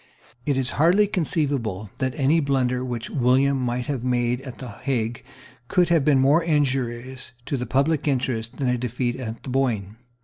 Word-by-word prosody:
It 140 -2 +2
is 130 -1 -1
hardly 180 +6 +5
conceivable 140 - -1
that 130 -1 -1
any 150 +3 +3
blunder 130 -4 0
which 120 -3 -4
William 135 +1 +3
might 125 0 -1
have 135 -3 -3
made 125 0 0
at 130 -3 -9
the 130 - -7
Hague 115 +1 -3 0.4
could 175 +4 +2
have 165 -4 +3
been 145 -1 +4
more 140 +6 +4
injurious 130 -5 -1
to - - -2
the 125 -2 -3
public 145 +3 +1
interests 125 -4 -1
than 135 - -1
a 125 -1 +1
defeat 125 0 -2
at 115 -3 -6
the - - -7
Boyne. 115 -6 -1
130 Hz, 175 wpm, -24 LUFS, 120-140 Hz, 0.4 s, hardly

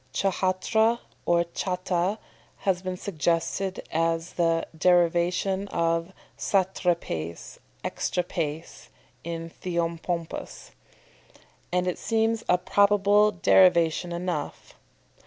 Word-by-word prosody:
Ch'hatra 195 +4 +1 0.3
or 170 0 +4
cháta 180 +2 -1 0.4
has 185 -2 +1
been 185 -1 -4
suggested 175 +2 -1
as 165 +1 0
the 165 -1 +1
derivation 175 +3 +2
of 165 0 0 0.3
satrapaes 175 - -1 0.3
(exatrapaes 165 -3 -3 0.4
in 165 0 -5
Theopompus), 170 - -3 1.0
and 180 0 +1
it 180 - -2
seems 225 0 0
a 180 - +5
probable 205 +2 +4
derivation 175 -2 +4
enough. 170 -3 -4
180 Hz, 85 wpm, -26 LUFS, 165-190 Hz, 1.0 s, a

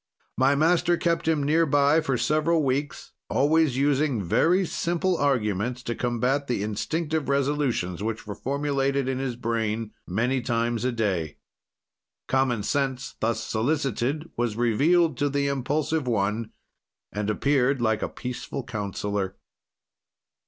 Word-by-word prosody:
My 135 +2 +3
master 170 +3 +3
kept 170 -1 0
him 155 -3 +2
near 160 +3 +3
by 145 +2 +4
for 135 -5 0
several 155 +4 +2
weeks, 140 +2 -2 0.2
always 145 +2 +3
using 140 -4 +1
very 175 - +3
simple 175 +2 0
arguments 125 - 0
to 120 - -2
combat 125 +4 0
the 120 -5 -1
instinctive 155 +9 -2
resolutions 140 - 0
which 110 +1 -3
were 105 - -5
formulated 140 +1 -1
in 130 0 -1
his 130 -3 -2
brain 115 -2 -2 0.2
many 125 +8 0
times 120 -1 -1
a 130 - +2
day. 95 -10 -1 0.9
"Common 130 -4 +1
sense, 135 +1 -1
thus 110 0 0
solicited, 135 +4 -1
was 120 -2 -1
revealed 145 +7 +3
to 145 0 +2
the 140 0 0
impulsive 140 +2 -1
one, 110 0 0 0.6
and 105 0 -2
appeared 135 +3 +2
like 110 -2 +1
a - - -2
peaceful 125 +1 -5
counselor. 100 -2 -3
130 Hz, 130 wpm, -25 LUFS, 115-145 Hz, 0.9 s, by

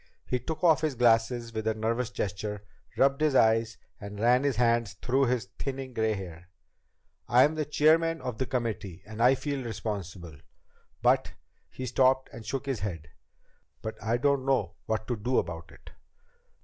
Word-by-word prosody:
He 125 - -1
took 160 +7 -5
off 160 -3 +5
his 155 -4 0
glasses 115 0 +2
with 110 0 -3
a 110 - +1
nervous 115 +2 -1
gesture, 105 -2 -4 0.3
rubbed 140 +2 +3
his 155 -3 +2
eyes, 115 -1 +3 0.2
and 100 0 -8
ran 125 +4 +4
his 140 -2 +1
hand 115 -1 +2
through 135 +3 +2
his 125 -2 0
thinning 135 -1 -4
gray 110 -2 +1
hair. 90 -2 -9 0.8
"I'm 130 +5 +5
the 155 -1 -2
chairman 160 +2 +3
of 125 -6 -5
the 130 - -1
committee, 115 -8 -3
and 110 +1 -7
I 125 +3 +6
feel 140 -1 -3
responsible. 100 -8 -5 0.7
But - - +3 0.2
" - - -43
He 130 - -3
stopped 130 +2 +2
and 115 - -9
shook 135 +4 -4
his 135 -5 -2
head. 85 -7 -5 0.7
"But 110 - -3
I 115 +3 +1
don't 140 +1 +2
know 130 -10 +1
what 110 0 -1
to 120 - -1
do 120 +4 -1
about 85 0 -3
it." - - -15
120 Hz, 175 wpm, -28 LUFS, 110-135 Hz, 0.8 s, I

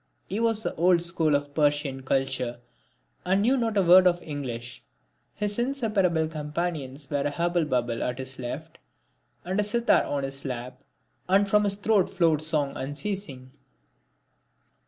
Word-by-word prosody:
He 200 - -4
was 225 -2 +1
of - - -2
the - - -8
old 175 -1 +4
school 165 -3 +1
of 145 0 -2
Persian 145 -3 +1
culture 130 -2 -1 0.6
and 195 +2 +2
knew 255 +5 +3
not 230 -4 -1
a 195 - +4
word 185 +1 +7
of 175 -1 +2
English. 125 -5 -6 0.5
His 210 +1 0
inseparable 210 - +1
companions 150 -3 -4
were 145 -1 0
a 145 - 0
hubble 170 +2 0
bubble 120 -4 -1
at 125 0 -2
his 130 0 -6
left, 120 -1 -6 0.7
and 185 +3 -1
a - - +3
sitar 235 +3 +3
on 140 -1 -2
his 135 0 -4
lap; 125 0 -6 0.5
and 200 +2 +4
from 210 +1 +3
his 200 -1 0
throat 205 -2 +2
flowed 165 -4 +2
song 155 -3 +1
unceasing. 145 -2 -4
160 Hz, 155 wpm, -26 LUFS, 135-195 Hz, 0.7 s, word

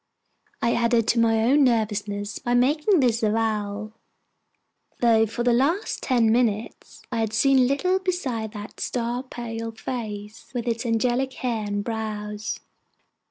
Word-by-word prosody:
I 235 - +3
added 235 -1 +2
to 235 - +3
my 225 -1 +3
own 280 +5 +4
nervousness 210 -4 0
by 245 0 0
making 300 +8 +3
this 235 -3 +2
avowal; 215 -1 -1 1.1
though 225 -2 +4
for 230 +3 -3
the 245 0 +3
last 315 - +1
ten 235 -4 +3
minutes 225 -2 -1
I 230 - -1
had 220 -1 -1
seen 265 +2 +4
little 365 +8 +1
besides 260 - -2
that 210 0 -9
star 240 0 -2
pale 230 -3 -6
face 220 -3 -6
with 240 0 -2
its 230 +1 -1
angelic 245 +3 +1
hair 230 -4 -2
and 205 0 -2
brows. 215 -2 -4
230 Hz, 140 wpm, -24 LUFS, 215-250 Hz, 1.1 s, own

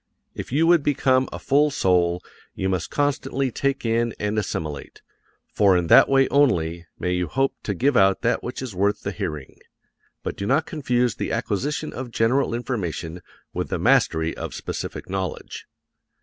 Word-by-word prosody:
If - - -7
you 155 +5 +3
would 170 -1 +5
become 130 -2 +2
a - - -5
full 145 +2 +3
soul 90 -7 +1 0.3
you 95 - -1
must 95 -2 -2
constantly 140 -2 -1
take 135 +1 -1
in 115 0 +1
and 105 +1 0
assimilate, 75 -7 -5 0.5
for 100 -3 +4
in 90 - 0
that - - +8
way 135 -1 +4
only 85 - +2
may 90 - -1
you 90 -1 -1
hope 135 - 0
to 105 - -3
give 135 +8 +2
out 95 -3 +4
that 115 - +1
which 125 +2 -5
is 125 -5 -6
worth 100 +3 0
the 100 - -2
hearing; 75 -6 -6 0.6
but - - -3
do 100 - -4
not 155 +5 +2
confuse 125 -6 0
the - - -3
acquisition 145 +9 -2
of 130 -2 -6
general 115 +2 +1
information 90 -8 -4 0.3
with - - -3
the - - -1
mastery 80 0 +2
of - - -6
specific - - -5
knowledge. 95 -2 -5
115 Hz, 170 wpm, -23 LUFS, 90-135 Hz, 0.6 s, that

